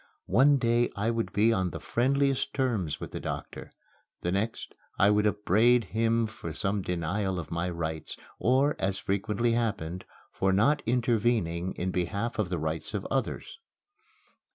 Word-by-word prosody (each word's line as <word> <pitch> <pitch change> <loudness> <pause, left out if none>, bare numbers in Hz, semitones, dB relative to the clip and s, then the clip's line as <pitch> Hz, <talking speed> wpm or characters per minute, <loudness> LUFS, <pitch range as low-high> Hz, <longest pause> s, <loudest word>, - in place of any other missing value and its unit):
One 140 +3 +5
day 120 -1 +2
I 105 +3 0
would 115 -1 -2
be 110 +3 +3
on 95 -3 0
the - - -6
friendliest 135 +2 +1
terms 115 - 0
with - - -7
the - - -5
doctor, - - -6 0.5
the 90 - -1
next 105 +4 -2 0.2
I 100 - +5
would 105 0 +3
upbraid 110 +4 +3
him 115 +3 +1
for 110 -7 -7
some 100 +4 -1
denial 90 +2 -1
of 80 -4 -6
my 85 +2 -1
rights 80 -2 -4 0.2
or, 135 +5 +3
as 95 0 0
frequently 105 +5 0
happened, 100 -7 -2 0.3
for 95 0 +1
not 135 +10 +3
intervening 115 -7 +1
in 95 +1 -2
behalf 100 +6 -2
of 100 -5 0
the 90 - -1
rights 80 +6 -3
of 100 - -3
others. 135 -1 -2
105 Hz, 155 wpm, -28 LUFS, 90-120 Hz, 0.5 s, One